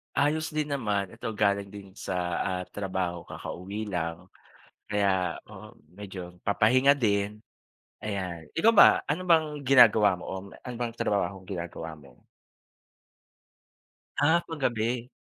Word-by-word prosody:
Ayos 155 +3 +1
din 150 -1 -1
naman. 105 -8 -1
Ito 115 +2 -6
galing 100 -2 0
din 100 -2 -11
sa, 90 - -4 0.3
ah, 90 -1 -2
trabaho, 95 -3 -3
kakauwi 100 +4 -6
lang 85 -1 -4 0.7
kaya 95 -4 +1
oo, - - -11 0.2
medyo 95 -3 -8
papahinga 130 +7 +4
din. 105 -3 0 0.6
Ayan, 95 -6 -4
ikaw 225 +7 +5
ba, - - +10 0.2
ano 160 +5 -1
bang 160 -2 +5 0.2
ginagawa 110 -7 +6
mo - - -9
o 95 - -4 0.2
ano 125 -1 -9
bang 120 -1 -2
trabahong 95 -4 -1
ginagawa 85 -3 -6
mo? 70 -5 -19 2.0
Ah, 160 +4 +4
kagabi. 120 -5 -1
100 Hz, 120 wpm, -28 LUFS, 95-125 Hz, 2.0 s, ba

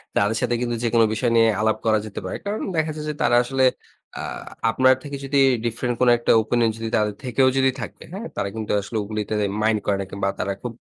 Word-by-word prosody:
তাদের 105 +2 +2
সাথে 120 - +1
কিন্তু 120 -1 -1
যেকোনো 115 -1 +4
বিষয় 120 +1 0
নিয়ে 115 -1 +5
আলাপ 110 0 +2
করা 110 -1 +3
যেতে 105 - -6
পারে। 95 - -4
কারণ 205 +2 -2
দেখা 160 -1 0
যায় 150 0 -6
যে, - - -2
তারা 120 - +3
আসলে 130 +1 0 0.6
আ - - -3 0.5
আপনার 130 +3 +5
থেকে 140 -1 -6
যদি 140 +1 -1 0.3
ডিফারেন্ট 120 +1 -1
কোনো 125 -1 +6
একটা 120 - +1
ওপিনিয়ন 115 0 +1
যদি 115 0 -4
তাদের 105 -1 0
থেকেও 130 +1 +2
যদি 135 0 +4
থাকে। - - -8
হ্যাঁ? 220 +5 -5
তারা 100 - -2
কিন্তু 110 -1 -4
আসলে 110 +3 -5
ওগুলিতে 105 0 -4 0.3
মাইন্ড 110 -1 +2
করে 100 - +1
না। - - -4
কিংবা 100 0 -2
তারা 100 +1 -1
খুব 120 -1 -5
115 Hz, 220 wpm, -23 LUFS, 110-130 Hz, 0.6 s, কোনো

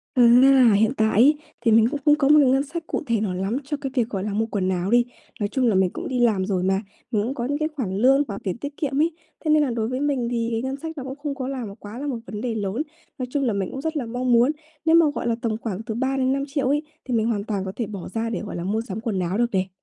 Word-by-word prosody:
Ừm, 240 -1 +7
nên 270 +1 +7
là 250 -4 +6
hiện 220 +5 +3
tại 220 0 +3
ấy, 295 +4 +6 0.2
thì 230 - +2
mình 225 0 +6
cũng 290 0 -3
không 295 - +6
có 275 -2 +2
một 300 +1 +7
cái 275 - +5
ngân 270 +1 +3
sách 320 +3 -6
cụ - - -2
thể 230 -2 +1
nào 200 -4 -1
lắm 195 +6 -1
cho 295 +2 -3
cái 270 - -3
việc, 240 -4 +1
gọi 195 -3 -3
là, 210 - -2
mua 220 +2 0
quần 200 -4 -1
áo 185 +1 -1
đi. 240 +1 +5 0.4
Nói 205 - 0
chung 255 +3 0
là 220 - +3
mình 185 -1 +3
cũng - - -6
đi 255 - -2
làm 210 -6 +2
rồi 190 -3 0
mà, 190 +1 +1 0.3
mình 215 -4 +1
cũng 245 +5 -2
có 235 - -3
những 285 +2 -1
cái 310 0 0
khoản 195 -9 -2
lương 265 +5 +5
hoặc 200 -2 -5
tiền 185 +1 -2
tiết 285 +2 -6
kiệm 280 -2 -1
ấy. 330 - +2 0.3
Thế 310 - +1
nên 305 -1 +5
là 275 - 0
đối 225 -2 -1
với 255 +2 -2
mình 275 -5 0
thì 230 -1 -1
ngân 265 +1 -3
sách 320 +3 -7
nó 265 - -5
cũng 265 +1 -6
không 295 -2 -2
có 265 -2 -4
là 265 -3 -4 0.2
quá 210 +3 -8
là 290 - -4
một 255 -5 -2
vấn 210 - -6
đề 235 0 -2
lớn. 210 +4 -2 0.4
Nói 255 - -2
chung 285 0 0
là 240 - +1
mình 195 -2 -2
cũng 265 - -5
rất 320 +1 -3
là 260 -6 -2
mong 245 +2 -1
muốn, 240 +5 +5 0.3
nếu 325 0 +5
mà 335 -2 +6
gọi - - -3
là 235 - +2
tầm 220 -2 0
khoảng 220 -3 -4
từ 225 -1 -5
3.000.000-5.000.000 270 +2 0
ấy 295 +2 +1 0.2
thì 255 - -3
mình 220 -1 +2
hoàn 210 -3 -1
toàn 205 -3 -2
có 190 - -4
thể 235 - -2
bỏ 200 -3 -7
ra 230 0 -1
để, - - -2
gọi 205 -4 -6
là, 170 - -4
mua 210 +4 0
sắm 215 -2 -5
quần 220 -4 -2
áo 180 +3 -1
được 240 0 +1
này. 185 0 +1
235 Hz, 315 wpm, -23 LUFS, 210-275 Hz, 0.4 s, Ừm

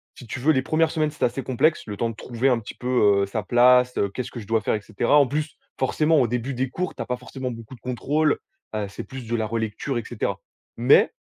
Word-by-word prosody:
si 125 - -12
tu 130 - -5
veux, 155 +4 +4
les 130 - +2
1res 160 +4 +1
semaines, 155 -1 0
c'était 150 - 0
assez 125 +2 -2
complexe, 155 +5 +1
le 105 - -4
temps 115 - 0
de 115 - -7
trouver 120 +4 -1
un 120 -2 +2
petit 105 - -9
peu, 105 -6 +3
heu, - - +1
sa 105 +2 -3
place, 125 +3 +5
heu, 100 - +1
qu'est-ce 125 +5 -5
que 120 - -7
je 100 - -12
dois 115 0 +2
faire 100 - 0
et 105 - -3
cetera. 115 +7 +2
En 140 -3 +5
plus, 150 +2 -3 0.2
forcément, 150 +4 +3
au 125 - +3
début 125 +3 -2
des 130 +1 -1
cours, 180 +6 -3
tu 120 - -6
as - - -3
pas 125 - -1
forcément 130 0 -6
beaucoup 115 +2 -9
de 120 - -20
contrôles, 145 +5 +1 0.4
heu, 105 -2 -2
c'est 100 - -7
plus 130 -3 -8
de 120 - -1
la 110 -1 0
relecture, 115 +4 -2
et 120 - -2
cetera. 120 - -3 0.4
Mais - - +5
125 Hz, 265 wpm, -24 LUFS, 115-135 Hz, 0.4 s, place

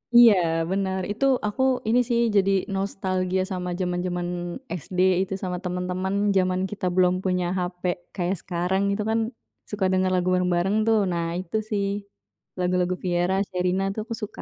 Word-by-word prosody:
Iya, 240 -2 +9 0.4
benar. 190 -1 0
Itu 225 +6 0 0.2
aku 210 +5 -3 0.3
ini 235 +3 +4
sih, 235 -1 +2 0.2
jadi 195 -1 +4 0.2
nostalgia 190 -1 -1
sama 180 -1 -3
zaman-zaman 180 -1 -1 0.6
SD 185 - -8 0.3
itu, 195 - -5
sama 180 -1 -2
teman-teman 180 +1 -2 0.2
zaman 185 0 +1
kita 205 -2 -4
belum 180 -1 +4
punya 180 -1 0
HP 180 0 -4 0.3
kayak 180 0 0
sekarang, 180 +2 -1
itu 210 +1 -1
kan 225 +1 +2 0.5
suka 205 -2 -1
dengar 185 0 +2
lagu 180 0 0
bareng-bareng 180 +2 +1
tuh. 225 -1 +4
Nah, 170 -1 -1
itu 185 +3 -3
sih 205 -2 0 0.8
lagu-lagu 180 0 +1
Vierra, 175 +1 +1
Sherina, 180 +1 0
itu 200 - -5
aku 230 - -3
suka. 210 - -6
185 Hz, 155 wpm, -25 LUFS, 180-195 Hz, 0.8 s, Iya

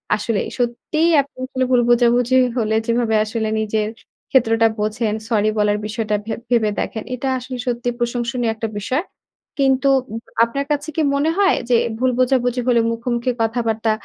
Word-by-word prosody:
আসলেই 210 0 -2
সত্যিই 245 +7 0
আপনি 280 +1 -14
আসলে 260 0 -2
ভুল 250 -1 +5
বোঝাবুঝি 240 +1 +3 0.2
হলে, 220 -2 +1
যেভাবে 230 -1 +1
আসলে 220 0 -2
নিজের 215 0 -1 0.4
ক্ষেত্রটা 225 -3 +4
বোঝেন, 215 +1 -1 0.2
সরি 215 -2 +2
বলার 210 0 +2
বিষয়টা 215 0 -2
ভেব 220 - -4
ভেবে 230 -3 +3
দেখেন। 220 - -3
এটা 250 +2 -4
আসলে 255 +1 -7
সত্যিই 245 0 -1
প্রশংসনীয় 240 0 -1
একটা 225 0 -3
বিষয়। 255 - -1 0.6
কিন্তু 270 0 +3 0.6
আপনার 275 +5 -1
কাছে 295 +1 -1
কি 320 - +1
মনে 285 +3 +1
হয়? 395 -1 +4
যে 245 - +4 0.2
ভুল 255 0 +2
বোঝাবুঝি 250 -1 +2
হলে 240 -2 +4
মুখোমুখি 235 +1 -1
কথাবার্তা 225 -1 0
240 Hz, 155 wpm, -20 LUFS, 225-255 Hz, 0.6 s, ভুল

